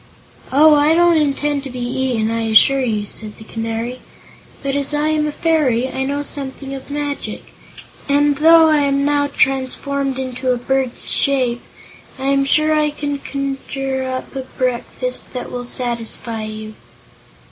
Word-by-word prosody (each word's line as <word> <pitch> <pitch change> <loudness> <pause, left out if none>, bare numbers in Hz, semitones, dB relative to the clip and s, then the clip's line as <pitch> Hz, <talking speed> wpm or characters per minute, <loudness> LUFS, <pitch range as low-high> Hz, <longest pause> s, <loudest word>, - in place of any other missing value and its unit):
"Oh, 300 +3 +6
I 295 +2 +4
don't 345 0 +5
intend 290 0 0
to 275 - -6
be 250 - -8
eaten, 245 -2 -1
I 230 0 -1
assure 270 +5 +5
you," 215 -4 -1
said 210 +1 -8
the - - -11
Canary, 225 +2 -4 0.6
"but 275 0 -1
as 285 +1 0
I 300 +1 +1
am 305 -1 +1
a - - -2
fairy 290 -7 +1
I 265 0 -2
know 285 +1 -2
something 275 -1 -6
of 270 0 -8
magic, 290 0 -5 0.6
and 290 0 +3
though 325 +1 +7
I 310 -1 +4
am 280 -1 +1
now 290 0 +2
transformed 270 0 0
into 255 0 -2
a 250 - +1
bird's 260 0 0
shape, 255 -4 +1 0.6
I 265 - -5
am 275 0 +2
sure 305 +2 +3
I 305 -1 +2
can 290 -1 -4
conjure 270 -1 -3
up 260 +1 -5
a 265 - -2 0.2
breakfast 255 - -2
that 250 - -5
will 245 0 -5
satisfy 235 -2 -2
you." 215 0 -7
270 Hz, 160 wpm, -18 LUFS, 245-290 Hz, 0.6 s, though